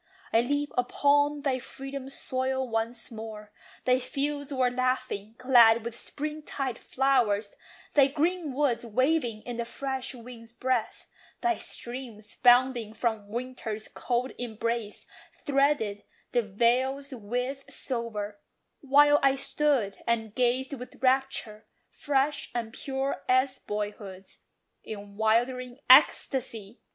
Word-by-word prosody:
I 225 - +6
leaped 285 +4 -1
upon 290 +3 +2
thy 260 -2 +1
freeborn 270 +1 -7
soil 260 -1 -2
once 225 0 -3
more: 215 -2 -8 0.3
Thy 255 0 +4
fields 285 +2 -2
were 255 -2 +2
laughing, 255 -4 -2
glad 235 -3 +6
with 235 0 -4
spring 300 +5 -4
tide 270 -5 -4
flowers, 235 -7 +1 0.4
Thy 280 -2 +6
greenwoods 290 -5 0
waving 240 -1 0
in 245 -1 -6
the 235 - -1
fresh 265 +2 -4
wind's 235 -1 -11
breath; 255 -2 -1 0.4
Thy 355 -1 +1
streams, 235 -4 -6
bounding 245 -3 +4
from 220 -3 -1
winter's 230 -2 -4
cold 250 +1 -2
embrace, 230 -2 -3 0.3
Threaded 275 -8 +1 0.3
the 245 - +3
vales 250 +7 +1
with 250 +4 -3
silver; 215 -5 -4 0.4
while 290 +1 +5
I 275 0 +4
stood 275 -6 +1
And 225 -2 0
gazed 255 +3 +1
with 255 0 -9
rapture, 255 -5 0 0.2
fresh 285 0 0
and 230 -2 -3
pure 270 +1 -3
as 255 +1 +3
boyhood's, 205 -2 -6 0.4
In 205 -1 -8
'wildering 245 +3 +1
ecstasy. 230 -4 +4
250 Hz, 115 wpm, -28 LUFS, 225-270 Hz, 0.4 s, I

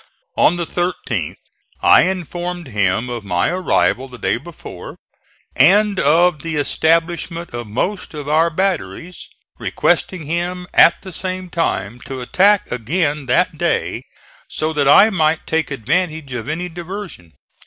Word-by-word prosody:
On 175 - +4
the 170 - -2
13th 160 - -3 0.5
I - - +7
informed 175 -2 -3
him 105 +1 0
of 120 -3 -5
my 90 -3 0
arrival 130 - +1
the 125 -1 -12
day - - 0
before 160 +6 -10 0.6
and 200 +7 +4
of 165 +2 +3
the 165 -1 -4
establishment 165 +2 0
of 120 -1 -5
most 165 - -3
of 145 -1 -6
our 160 +3 +3
batteries, 180 0 -3 0.3
requesting 185 -4 0
him 175 +3 -3
at - - +5
the 185 -2 -9
same 185 0 -5
time 120 - -2
to 135 0 -5
attack 195 +11 +2
again 145 +3 -1
that 160 +5 +1
day 170 -1 -1 0.5
so 155 +1 -2
that 145 -2 +1
I 205 +10 +7
might 160 -4 +1
take 160 -1 -1
advantage 155 - -2
of 125 +2 -5
any 175 +3 -3
diversion. 175 - -8
165 Hz, 140 wpm, -18 LUFS, 135-180 Hz, 0.6 s, I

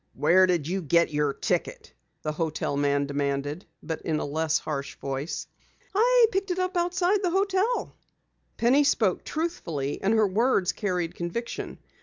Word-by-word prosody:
"Where 185 +1 +5
did 170 -5 0
you 190 +3 -1
get 170 0 +2
your 150 -1 +1
ticket?" - - -3 0.3
the 155 - -1
hotel 155 -2 -2
man 140 0 +1
demanded 140 +3 -2 0.2
but 160 -2 -4
in 160 -2 -1
a - - -2
less 155 +2 0
harsh 140 -2 -4
voice. 135 +4 -4 0.5
"I 480 +4 +5
picked 390 +1 -1
it 360 - -1
up 370 0 -1
outside 360 +3 +1
the 365 - +1
hotel." 390 +5 0 0.6
Penny 260 +5 +4
spoke 220 -9 +2
truthfully 170 - -3
and 205 +4 +2
her 220 -1 +4
words 200 -1 +2
carried 180 -5 -2
conviction. 175 +8 -5
180 Hz, 155 wpm, -26 LUFS, -, 0.6 s, Where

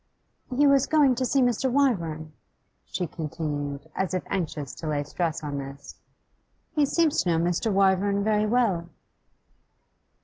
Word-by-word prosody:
'He 275 +2 +2
was 275 -1 +4
going 295 -4 +4
to 255 +1 -1
see 270 0 +3
Mr. 245 +2 +1
Wyvern,' 170 - 0 0.5
she 180 - -3
continued, 150 -3 -4
as 190 -1 -1
if 185 - -2
anxious 155 -7 -3
to 160 - -7
lay 145 -1 0
stress 160 +2 -3
on 145 -1 -3
this. 140 +1 -9 0.7
'He 295 -3 +2
seems 325 0 +2
to 180 - -1
know 165 - +2
Mr. 175 +6 0
Wyvern 195 +1 +2
very 215 0 +2
well. 210 -8 +1
185 Hz, 145 wpm, -26 LUFS, 155-245 Hz, 0.7 s, was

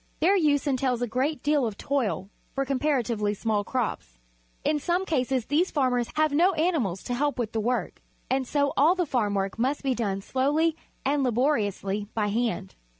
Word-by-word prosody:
Their 370 +5 +4
use 300 -6 +2
entails 255 -3 0
a - - 0
great 260 +4 -1
deal 290 -1 +2
of 210 -2 -6
toil 215 -8 -1 0.2
for 275 0 0
comparatively 250 -7 0
small 210 0 0
crops. 215 - -3 0.5
In 300 - +1
some 355 +5 0
cases 260 -6 0
these 320 +8 +2
farmers 250 -5 +1
have 310 0 +3
no 350 +6 +4
animals 305 - 0
lo 245 - -1
help 290 +1 0
with 230 -3 -2
the 225 - -1
hea\ 215 - -3
A' - - +1
work, 250 0 -2 0.3
and 265 0 0
so 285 0 +1
all 320 +6 +5
the 360 -2 0
farm 220 -8 0
work 195 +2 -2
must 270 +5 0
be 270 -1 +1
done 200 -5 -2
slowly 295 +8 +1 0.3
and 280 +1 +2
labor 255 +3 +2
iously 205 -1 -2
by 210 -2 +1
hand. 220 - -1
260 Hz, 195 wpm, -26 LUFS, 220-295 Hz, 0.5 s, all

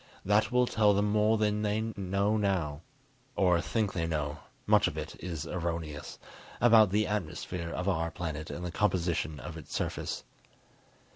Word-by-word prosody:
That 105 +4 +3
will 125 0 +4
tell 105 -4 +3
them 105 +1 +2
more 105 +1 +3
than 105 -1 +1
they 105 0 +1 0.2
know 100 +2 0
now 90 -8 0 0.5
(or 90 -3 +3
think 110 +2 -1
they 85 -3 -1
know; 75 -1 -2 0.3
much - - +5
of - - -4
it - - -5
is 85 -4 -4
erroneous) 85 -4 -4 0.4
about 110 -4 +7
the 105 +3 +2
atmosphere 90 -3 -3
of 90 +3 -3
our 85 -3 +1
planet 80 -2 -5
and 90 - -5
the 90 - -3
composition 85 -6 0
of 80 +3 -7
its 80 - -8
surface. - - -3
90 Hz, 160 wpm, -30 LUFS, 80-105 Hz, 0.5 s, about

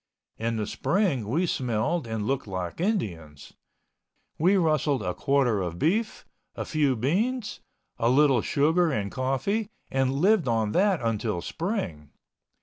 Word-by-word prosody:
In 115 +1 -1
the 105 - -1
spring 150 - 0
we 160 +11 +1
smelled 125 +1 -1
and 110 -2 -3
looked 135 -1 -1
like 95 - -4
Indians. 85 - -3 0.9
We 185 +5 +4
rustled 155 - +1
a 90 - -1
quarter 135 -6 +1
of 85 -2 -4
beef, 215 - 0 0.3
a - - -4
few 145 -4 +1
beans, 205 - -1 0.4
a 115 - +2
little 135 -2 +4
sugar 160 +7 +2
and 100 -6 -2
coffee 135 - -1 0.2
and 135 0 +1
lived 180 +2 +3
on 110 -3 +1
that 190 - +2
until 110 -4 -1
spring. 160 - -4
135 Hz, 140 wpm, -26 LUFS, 110-175 Hz, 0.9 s, We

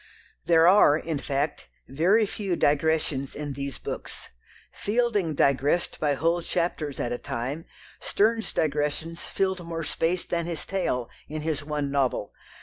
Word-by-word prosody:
There 165 -1 +6
are, 180 -6 +7
in 160 -2 -3
fact, 140 - -2 0.2
very 190 +10 +3
few 195 -3 -2
digressions 150 -3 +1
in 145 -1 -4
these 140 0 -5
books. - - -7 0.4
Fielding 210 -7 0
"digressed" 140 +5 +2
by 145 -2 +2
whole 165 +5 +1
chapters 165 -5 -2
at 120 - -1
a 120 - -2
time, 135 +4 -4 0.3
Sterne's 225 +2 +1
digressions 150 +2 -1
filled 190 -2 -1
more 165 -1 -4
space 165 +3 0
than 170 -1 -1
his 170 -3 -4
tale 125 -11 -1 0.2
in 155 +1 -5
his 155 -2 -1
one 145 -2 -2
"novel." 135 -7 0
160 Hz, 145 wpm, -26 LUFS, 140-175 Hz, 0.4 s, are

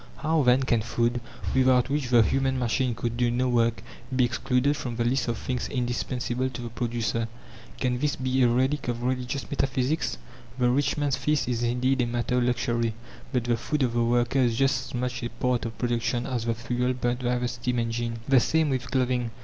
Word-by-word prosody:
How 160 +1 +1
then 125 0 +4
can 120 -3 +2
food, 120 +2 0 0.3
without 130 -1 +3
which 145 -3 -1
the 120 -2 +6
human 135 +2 +1
machine 125 0 0
could 120 0 -3
do 120 -1 +2
no 125 +2 +1
work, 115 -2 +1 0.3
be 125 -1 +4
excluded 125 +4 +1
from 120 -4 -4
the 120 - 0
list 125 +1 +1
of 120 - -1
things 125 -1 -3
indispensable 125 0 -2
to 125 -1 -7
the 120 - -5
producer? 115 -1 -2 0.5
Can 125 -1 0
this 145 +1 0
be 130 0 0
a 125 - +6
relic 130 +4 +1
of 120 0 -2
religious 125 +2 -2
metaphysics? 135 +2 0 0.4
The 125 -1 +3
rich 140 +4 +1
man's 145 -3 +1
feast 145 +1 0
is 120 -2 -1
indeed 125 +2 +1
a 120 - +1
matter 120 +1 0
of 120 - +1
luxury, 120 -2 0 0.4
but 125 -2 0
the 120 -1 +1
food 150 +5 -1
of 120 -2 0
the 120 0 +2
worker 120 +2 +2
is 120 -3 +3
just 135 -1 +1
as 125 - -7
much 125 0 -2
a 120 - -3
part 125 -2 -1
of 115 0 -5
production 120 0 0
as 125 -4 -2
the 115 -1 0
fuel 125 +2 -1
burnt 125 0 -2
by 125 0 +1
the 125 0 -1
steam 120 +1 -2
engine. 115 0 -2
The 135 -2 +6
same 155 +3 +2
with 130 -2 -2
clothing. 125 -2 0
125 Hz, 210 wpm, -26 LUFS, 120-130 Hz, 0.5 s, the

